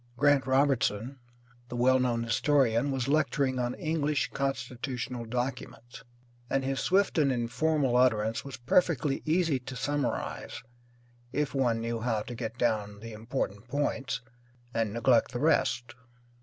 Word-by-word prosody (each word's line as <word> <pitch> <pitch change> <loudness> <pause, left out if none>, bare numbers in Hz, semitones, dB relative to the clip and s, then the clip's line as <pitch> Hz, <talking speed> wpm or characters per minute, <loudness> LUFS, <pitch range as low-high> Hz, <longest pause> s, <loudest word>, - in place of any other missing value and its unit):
Grant 145 -1 +3
Robertson, 130 -2 +1 0.5
the - - -5
well 130 +2 +4
known 120 -2 +1
historian, 120 +1 +2
was 135 -2 -1
lecturing 140 -3 +1
on 120 0 -1
English 155 -3 -1
constitutional 125 -2 -3
documents, 120 0 -5 0.5
and 135 -1 0
his 135 0 -1
swift 190 -2 +2
and 140 -3 +3
informal 130 +2 +1
utterance 115 -3 +2
was 140 -1 -8
perfectly 140 +1 +1
easy 160 -3 +2
to 130 +1 -8
summarize 145 +3 -3 0.7
if 145 +2 -1
one 120 -4 +1
knew 115 0 -2
how 110 -2 -1
to 120 - -7
get 115 0 -5
down 105 -4 0
the 115 +1 -8
important 110 -1 -4
points 135 -2 -1 0.5
and 115 -2 0
neglect 115 +2 +2
the 120 - -2
rest. 125 -5 +1
125 Hz, 135 wpm, -29 LUFS, 115-140 Hz, 0.7 s, well